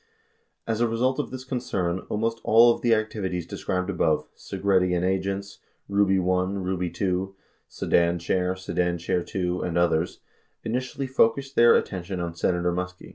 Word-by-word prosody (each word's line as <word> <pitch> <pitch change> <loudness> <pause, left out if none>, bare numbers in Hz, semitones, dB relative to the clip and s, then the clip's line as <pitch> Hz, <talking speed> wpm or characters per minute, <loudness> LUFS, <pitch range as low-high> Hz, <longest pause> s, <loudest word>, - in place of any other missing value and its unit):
89 115 - +1
As 110 - -2
a 120 - +4
result 125 +4 0
of - - -2
this 130 0 -7
concern, 100 -9 -2
almost 115 +2 -1
all 115 +2 +6
of - - -9
the 120 -2 +4
activities 100 -5 -2
described 90 +1 -3
above 80 -6 +1
Segretti 95 -2 +1
and 90 +1 0
agents, 95 +1 -2 0.3
Ruby 100 -1 +3
I, 90 0 +1
Ruby 90 -2 -2
II, 95 0 -1 0.3
Sedan 85 0 +1
Chair, 90 +2 0
Sedan 90 -2 -1
Chair 85 +1 -1
IT, 85 - -10
and 90 -2 -1
others 85 -1 +1 0.2
— - - -45
initially 130 +4 -2
focused 135 +1 +1
their 120 0 +7
attention 95 -1 -2
on 85 -1 -3
Senator 90 +1 0
Muskie. 90 +1 -5
95 Hz, 165 wpm, -25 LUFS, 90-115 Hz, 0.3 s, their